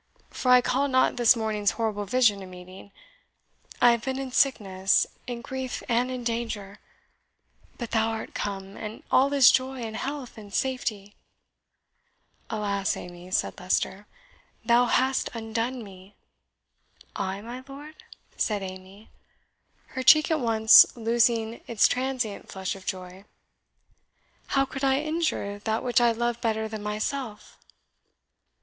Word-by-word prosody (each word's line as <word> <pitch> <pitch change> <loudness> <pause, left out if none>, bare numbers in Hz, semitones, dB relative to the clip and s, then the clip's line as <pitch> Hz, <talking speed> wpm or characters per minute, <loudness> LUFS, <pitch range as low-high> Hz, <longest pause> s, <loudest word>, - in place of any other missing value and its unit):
for 255 - -2
I 250 0 +7
call 270 +3 0
not 260 -1 +2
this 240 0 +5
morning's 215 -3 0
horrible 215 -3 -1
vision 215 -2 +2
a 190 - -9
meeting. 185 +2 -12 0.9
I 245 -1 +7
have 235 -1 -1
been 265 0 -2
in 270 -1 -5
sickness, 195 -8 +2 0.2
in 240 -1 -5
grief, 260 0 -5
and 245 +2 +1
in 255 -1 -5
danger. 230 -4 -4 1.0
But 240 -2 -6
thou 225 -1 +2
art 225 -1 -5
come, 195 -1 -5
and 215 +1 -8
all 275 +2 +4
is 275 -3 +7
joy, 260 0 -1
and 220 -1 -5
health, 270 -3 -5
and 205 -2 -12
safety!" 215 -5 -2 1.4
"Alas, 200 -2 -1
Amy," 175 0 -10
said 185 - -1
Leicester, 190 +2 -1 0.6
"thou 240 +1 +4
hast 260 +2 +1
undone 230 +2 -3
me!" 190 0 -14 1.0
"I, 195 0 -3
my 240 +4 -8
lord?" 290 +3 -10 0.4
said 210 -3 -1
Amy, 190 +3 -10 0.8
her 260 - -4
cheek 310 +5 +6
at 315 - +2
once 220 -2 +7
losing 230 0 +1
its 230 -3 +4
transient 255 -4 -3
flush 190 0 -4
of 190 -1 -13
joy 185 0 -6 1.3
"how 275 - +4
could 270 +1 -7
I 270 0 +3
injure 310 -10 -2
that 220 +1 -2
which 245 -1 +2
I 240 -1 +4
love 235 +1 -2
better 220 -1 -1
than 220 -1 -6
myself?" 215 +2 -4
230 Hz, 140 wpm, -26 LUFS, 205-255 Hz, 1.4 s, I